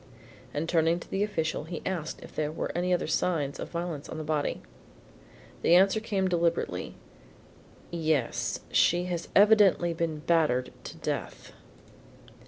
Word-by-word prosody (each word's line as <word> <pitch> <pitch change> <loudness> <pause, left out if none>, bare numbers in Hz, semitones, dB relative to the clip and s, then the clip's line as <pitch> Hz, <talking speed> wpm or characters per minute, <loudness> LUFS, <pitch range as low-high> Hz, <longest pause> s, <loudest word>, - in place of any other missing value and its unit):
And 150 +3 -3
turning 165 0 +2
to - - -11
the 195 - -2
official 165 -7 -1
he 165 +1 -6
asked 170 -4 -3
if - - -12
there 150 -1 -1
were 155 - -3
any 180 +1 -1
other 180 - +1
signs 155 -3 0
of - - -5
violence 170 -4 -4
on - - -6
the 155 - -4
body. 150 -1 -1 1.0
The 170 - +5
answer 195 +4 +5
came 200 -4 -1
deliberately, 170 -2 -1 1.0
"Yes, 155 -7 -1
she 175 +1 +3
has 175 -2 -3
evidently 200 -4 +5
been 160 -2 -2
battered 155 -7 +1
to - - -8
death." - - -5
170 Hz, 145 wpm, -28 LUFS, 155-180 Hz, 1.0 s, The